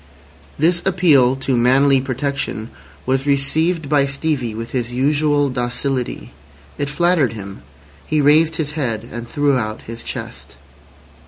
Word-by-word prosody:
This 170 +3 +2
appeal 155 -9 +4
to 135 -1 -1
manly 130 +3 +4
protection 130 -4 -3 0.3
was 135 +2 0
received 155 +4 +1
by 140 -1 +2
Stevie 135 -5 -2
with 115 +1 -6
his 120 -2 -2
usual 145 +3 +1
docility. 125 +1 -3 0.5
It 145 -1 -1
flattered 170 -4 +2
him. 100 -3 -9 0.4
He 155 - -1
raised 155 +3 +4
his 150 -2 -2
head 120 -7 -3
and 120 +1 -6
threw 145 +2 +1
out 110 -1 -5
his 115 +1 -8
chest. - - -7
140 Hz, 135 wpm, -19 LUFS, 125-150 Hz, 0.5 s, appeal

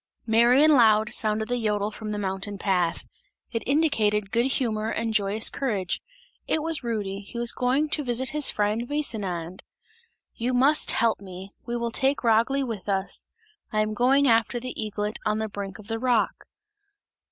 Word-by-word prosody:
Merry 235 +5 +5
and 310 0 +6
loud 220 -3 +4
sounded 215 -1 0
the 245 -1 -1
jodel 210 -1 0
from 215 0 -7
the 210 - -3
mountain 195 0 -4
path, 180 -4 0 0.5
it 230 - -2
indicated 215 -9 +1
good 235 +2 +2
humour 220 -4 -1
and 225 0 -2
joyous 210 +1 +1
courage; 205 -10 -2 0.5
it 310 - +1
was 320 -4 0
Rudy; 205 -4 -3
he 205 +4 -10
was 235 0 +2
going 265 +4 +1
to 300 - 0
his 260 +4 +1
friend 210 +3 -1
Vesinand. 195 - -2 0.7
"You 250 +2 -2
must 280 +5 +3
help 230 -1 +2
me! 190 0 -9 0.2
We 240 0 -2
will 235 0 -2
take 270 +4 +1
Ragli 235 +4 +2
with 215 -5 -6
us; 195 0 -2 0.4
I 215 - +1
am 215 0 -1
going 265 +5 +3
after 230 +1 +2
the 255 +1 -6
eaglet 210 0 -3
on 215 -1 0
the 220 0 -2
brink 200 -2 -6
of 215 - -13
the 225 0 -3
rock!" 245 -2 0
225 Hz, 170 wpm, -25 LUFS, 210-250 Hz, 0.7 s, and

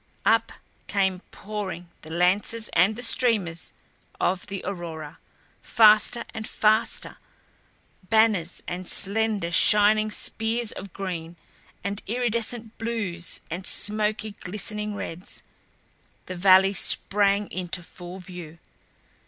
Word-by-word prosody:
Up - - +3 0.4
came 190 -2 0
pouring 200 -4 -6
the 155 - -12
lances 190 +6 0
and 185 +6 +4
the 245 - -5
streamers 210 - 0 0.5
of 185 0 0
the 195 -1 -6
aurora; 165 -5 -6 0.4
faster 215 +1 +5
and 220 -1 -5
faster, 220 +1 +1 0.9
banners 215 -6 +2
and 180 +1 -5
slender 205 -3 +1
shining 210 +5 +4
spears 225 +1 -1
of 195 0 -9
green 175 -4 -5 0.5
and 200 +1 -3
iridescent 235 -1 -2
blues 205 -7 -2
and 180 +3 -4
smoky, 215 0 +3
glistening 210 +2 -2
reds. 180 -2 -7 0.8
The 185 - -6
valley 190 +2 +5
sprang 200 +1 +3
into 180 -1 -3
full 175 +2 -10
view. 175 -4 -10
200 Hz, 105 wpm, -25 LUFS, 180-215 Hz, 0.9 s, faster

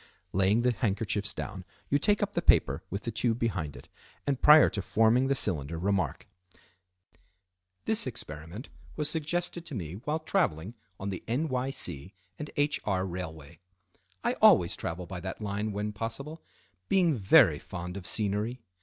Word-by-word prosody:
Laying 100 +5 +3
the 125 - +4
handkerchiefs 105 -2 -1
down, - - -6 0.3
you 140 - +4
take 205 +6 +2
up 205 0 -2
the - - 0
paper - - +3
with 100 +3 -4
the 115 - -2
tube 115 +1 0
behind 95 - -2
it, - - -12 0.4
and, 140 -2 -1
prior 150 +1 +8
to 100 - -2
forming 115 +6 +3
the 140 - +2
cylinder, 80 - 0
remark:—"This 90 - -5
experiment 90 - -7 0.3
was 150 -1 +1
suggested 170 +2 -1
to 145 - -6
me 85 -6 -5
while 145 +10 -2
traveling 140 - -1 0.3
on 100 +1 -3
the 95 - -6
N. 135 +8 0
Y. 130 0 -1
C. 90 - -3 0.2
& 150 -1 -8
H. 145 +1 +1
R. 95 -2 0
railway. 80 -5 -7 0.6
I - - +1
always - - +6
travel 90 +2 -5
by 90 0 -6
that 95 +1 -6
line 105 0 -2
when 105 +1 -3
possible, 115 +9 -5 0.5
being 175 -6 +3
very 100 -5 +5
fond 90 +1 -7
of 95 -2 -5
scenery. 105 +4 -1
105 Hz, 160 wpm, -29 LUFS, 90-135 Hz, 0.6 s, prior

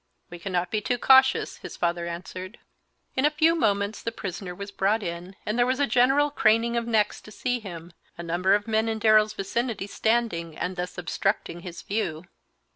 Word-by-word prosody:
"We 175 - -8
cannot 180 0 -2
be 215 - 0
too 245 +4 0
cautious," 265 +2 +4
his - - -9
father 170 0 -1
answered. 185 +3 -7 0.6
In 260 - +1
a 300 - +5
few 315 +2 +3
moments 205 -8 0
the 230 - -3
prisoner 185 -4 -6
was 200 +2 -7
brought 205 +3 +1
in, 175 +2 -6
and 215 +3 -1
there 240 - +5
was 255 +1 0
a 285 - +4
general 275 +3 +3
craning 230 +1 +3
of 235 0 -1
necks 215 -3 +1
to - - -13
see 245 +3 -2
him, 175 -5 -9 0.2
a 170 - -6
number 180 +3 +2
of 205 +1 -2
men 220 0 +1
in 220 - -1
Darrell's 215 -1 +4
vicinity 220 +1 -2
standing 205 -7 -1
and 185 +1 -3
thus 180 0 -5
obstructing 180 0 -2
his 175 -1 -9
view. 190 -7 -2
210 Hz, 195 wpm, -26 LUFS, 180-235 Hz, 0.6 s, a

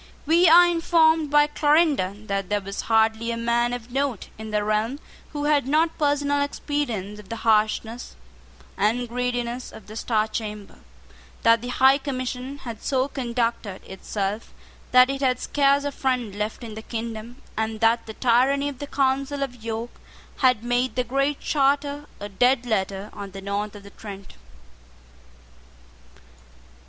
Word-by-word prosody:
We 335 +3 +5
are 350 +2 +8
informed 325 -2 +3
by 295 0 +5
Clarendon 295 - +1
that 195 -2 -2
there 205 0 +1
was 200 0 -5
hardly 225 +1 +2
a 230 - -2
man 235 +1 +1
of 245 -1 -6
note 270 -4 -2
in 220 0 -6
the 210 -1 0
realm 215 +6 0 0.3
who 290 -1 -4
had 290 -3 +2
not 320 +3 +2
personal 285 -1 +1
experience 240 -9 -3
of 205 - -14
the 230 - -3
harshness 220 +2 +1 0.6
and 230 +5 +1
greediness 245 0 -3
of 215 - -12
the 215 +1 -11
Star 220 -1 0
Chamber, 210 -2 -6 0.6
that 230 -1 +5
the 245 - -6
High 265 +2 +4
Commission 260 0 -4
had 230 -3 -7
so 265 -1 0
conducted 235 -6 -2
itself 195 +2 -4 0.4
that 255 +1 +6
it 275 0 -4
had 255 -2 +2
scarce 280 0 +2
a 285 - -2
friend 250 -7 -1
left 210 +4 -4
in 225 -2 -7
the 220 - -7
kingdom, 230 +2 -6 0.2
and 220 0 -2
that 230 +1 +2
the 220 - -8
tyranny 265 +4 +2
of 275 -3 -9
the 285 - -5
Council 275 +1 0
of 250 -4 -7
York 230 +1 -4 0.5
had 250 -4 +3
made 245 +1 0
the 250 - +1
Great 275 +4 0
Charter 285 0 0
a 205 - -5
dead 245 +5 +2
letter 200 -2 -2
on 200 -1 -7
the 195 - -7
north 200 +2 -3
of 205 - -11
the 200 - -13
Trent. 200 -2 -10
245 Hz, 160 wpm, -24 LUFS, 215-280 Hz, 0.6 s, are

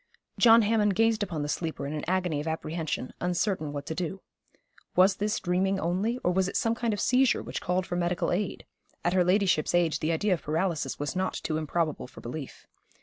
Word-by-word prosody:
John 230 -1 +7
Hammond 210 -2 +2
gazed 225 +1 +3
upon 170 -7 -2
the - - -2
sleeper 160 -1 -3
in 145 - -4
an 150 - -4
agony 180 -4 0
of 155 - -6
apprehension, 160 -3 -3
uncertain 175 -3 0
what 145 -1 -5
to - - -3
do. 185 +3 -4 0.7
Was 190 +1 +5
this 210 +1 0
dreaming 190 +2 +1
only; 195 +8 0
or 180 - +2
was 190 +1 +1
it - - -2
some 225 - +1
kind 230 0 -1
of 205 - -2
seizure 255 +3 +3
which - - -5
called 180 +1 0
for 180 - -4
medical 175 0 0
aid? 190 +2 -2 0.4
At 175 - +2
her 185 -1 +4
ladyship's 180 -3 +2
age 165 -3 +2
the 155 - 0
idea 185 +5 +1
of 170 - -2
paralysis 165 +1 -1
was 145 +2 -3
not 185 0 -1
too 155 - -2
improbable 155 -2 -1
for - - -13
belief. 135 +3 -7
180 Hz, 205 wpm, -28 LUFS, 160-195 Hz, 0.7 s, John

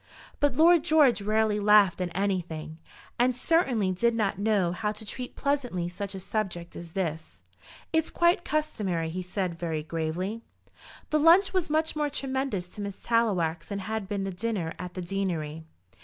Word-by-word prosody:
But 290 -3 +2
Lord 330 +2 +6
George 305 -9 +4
rarely 215 0 +1
laughed 205 -3 +5
at 180 - -1
anything, 175 -5 -2 0.4
and 250 0 +3
certainly 250 - +2
did 235 +6 +1
not 200 -4 0
know 200 -4 +2
how 210 +4 -2
to 215 +1 -9
treat 250 +4 -5
pleasantly 250 -12 -1
such 195 +2 -6
a - - -5
subject 185 -4 -3
as 170 -1 -9
this. 160 -4 -4 0.5
"It's 320 0 +2
quite 345 0 +2
customary," 200 - -1
he 185 +2 -3
said 180 -2 -3
very 160 -3 -2
gravely. 165 +7 -3 0.7
The 305 - +3
lunch 345 +6 +6
was 370 -5 0
much 315 +1 +1
more 300 -1 0
tremendous 265 -9 -2
to 205 - -9
Miss 200 -1 -6
Tallowax 185 -9 +1
than 200 - -3
had 210 +1 -4
been 200 -1 -2
the 195 - -3
dinner 190 -4 -2
at 180 0 -7
the 185 - -4
deanery. 170 -5 -3
200 Hz, 170 wpm, -28 LUFS, 175-250 Hz, 0.7 s, Lord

